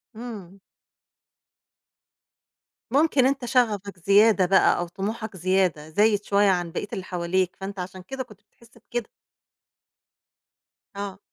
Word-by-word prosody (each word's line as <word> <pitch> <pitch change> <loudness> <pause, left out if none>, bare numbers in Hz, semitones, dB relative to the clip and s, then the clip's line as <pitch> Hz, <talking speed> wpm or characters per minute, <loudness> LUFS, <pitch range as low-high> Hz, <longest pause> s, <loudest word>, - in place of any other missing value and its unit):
امم. 205 -5 -9 2.3
ممكن 285 -1 +3
أنت 265 -1 0
شَغفك 210 -6 0
زيادة 200 +2 +5
بقى 190 +2 +4
أو 175 - -2
طموحك 210 +2 -5
زيادة، 180 -4 0
زايد 205 +4 +2
شويّة 200 0 +3
عن 175 -2 0
بقية 205 - -4
اللي 190 - -4
حواليك 180 0 -1
فأنت 195 0 -7
عشان 185 +1 -6
كده 265 +8 -6
كُنت 210 -5 -18
بتحس 235 +3 -23
بكده. 235 0 -5 1.9
آه. 200 -1 -6
200 Hz, 115 wpm, -25 LUFS, 185-225 Hz, 2.3 s, زيادة